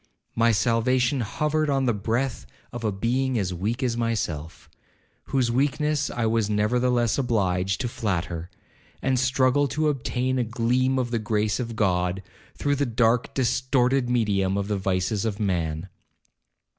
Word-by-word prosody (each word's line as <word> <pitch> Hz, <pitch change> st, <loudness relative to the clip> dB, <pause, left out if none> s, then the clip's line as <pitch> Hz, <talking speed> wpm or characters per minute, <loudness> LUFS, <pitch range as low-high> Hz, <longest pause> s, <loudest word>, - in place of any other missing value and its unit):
My 115 Hz, 0 st, +3 dB
salvation 120 Hz, +4 st, +2 dB
hovered 150 Hz, +7 st, 0 dB
on 135 Hz, -1 st, +1 dB
the 120 Hz, -, +2 dB
breath 115 Hz, -, -2 dB, 0.3 s
of 120 Hz, -1 st, -6 dB
a 110 Hz, -, +1 dB
being 125 Hz, +6 st, 0 dB
as 95 Hz, -4 st, -1 dB
weak 110 Hz, +9 st, -2 dB
as 120 Hz, -2 st, 0 dB
myself, 90 Hz, -9 st, -3 dB, 0.6 s
whose 125 Hz, -3 st, +1 dB
weakness 145 Hz, +3 st, +1 dB
I 120 Hz, -, -2 dB
was 110 Hz, -1 st, +1 dB
nevertheless 120 Hz, +3 st, +1 dB
obliged 95 Hz, -6 st, 0 dB
to 125 Hz, -, -1 dB
flatter, 90 Hz, -7 st, -3 dB, 0.5 s
and 130 Hz, -2 st, +2 dB
struggle 130 Hz, +2 st, +2 dB
to 155 Hz, +2 st, 0 dB
obtain 130 Hz, -2 st, -1 dB
a -, -, +2 dB
gleam 125 Hz, +3 st, +1 dB
of 125 Hz, -2 st, -1 dB
the 115 Hz, -, 0 dB
grace 110 Hz, 0 st, 0 dB
of 115 Hz, -2 st, -4 dB
God, 90 Hz, -2 st, 0 dB, 0.3 s
through 145 Hz, 0 st, 0 dB
the 145 Hz, -1 st, 0 dB
dark 115 Hz, +1 st, +1 dB
distorted 130 Hz, 0 st, +1 dB
medium 100 Hz, -5 st, +1 dB
of 100 Hz, 0 st, -2 dB
the 105 Hz, -, 0 dB
vices 95 Hz, +2 st, 0 dB
of 110 Hz, -2 st, -2 dB
man. 85 Hz, -4 st, -1 dB
115 Hz, 150 wpm, -25 LUFS, 100-130 Hz, 0.6 s, My